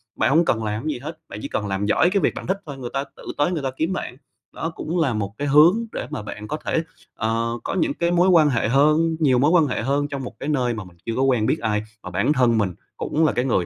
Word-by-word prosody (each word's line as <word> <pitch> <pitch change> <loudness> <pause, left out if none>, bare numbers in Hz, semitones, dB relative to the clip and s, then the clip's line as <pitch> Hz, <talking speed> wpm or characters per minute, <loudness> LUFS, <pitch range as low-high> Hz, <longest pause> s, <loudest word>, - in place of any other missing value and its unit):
bạn - - +2
hông 165 +5 +4
cần 115 -6 +1
làm 105 +2 -3
cái 155 - 0
gì - - -7
hết, 155 +4 -8
bạn 105 - -7
chỉ - - -3
cần 105 - -3
làm 100 +1 -1
giỏi 135 +11 +3
cái 195 +1 +1
việc - - +2
bạn - - -7
thích 190 +1 0
thôi, 145 -3 -7
người 125 -2 -6
ta 135 - 0
tự - - -14
tới 145 +4 +2
người 160 -5 -2
ta 135 - -1
kiếm 165 +4 0
bạn. 125 -8 -5 0.4
Đó 165 - -3
cũng 170 +3 -3
là 140 -7 +2
một 100 -2 -3
cái 145 - -2
hướng 165 +11 +5
để - - -5
mà - - -4
bạn 105 +1 -8
có 150 - -3
thể, 165 - 0 0.3
ờ, 115 +1 -1
có - - -3
những 305 -2 +1
cái 170 -9 0
mối 175 +1 +4
quan 165 -5 +6
hệ 120 -5 +1
hơn, 155 +6 +3
nhiều 135 -6 +3
mối 145 +5 +4
quan 170 -3 +5
hệ 125 - -2
hơn 140 +4 0
trong 140 -2 -5
một 125 - -7
cái 145 - -4
nơi 125 -5 +1
mà 105 -3 -5
mình 90 -2 -16
chưa 115 - -2
có 130 - 0
quen 125 -5 +2
biết - - +1
ai, 105 -2 -1 0.2
mà 90 - -6
bản 100 - +1
thân 125 -4 +3
mình 100 -4 0 0.2
cũng 160 +2 0
là 155 - +3
cái 125 - -1
người 110 -9 +1
135 Hz, 300 wpm, -22 LUFS, 110-160 Hz, 0.4 s, quan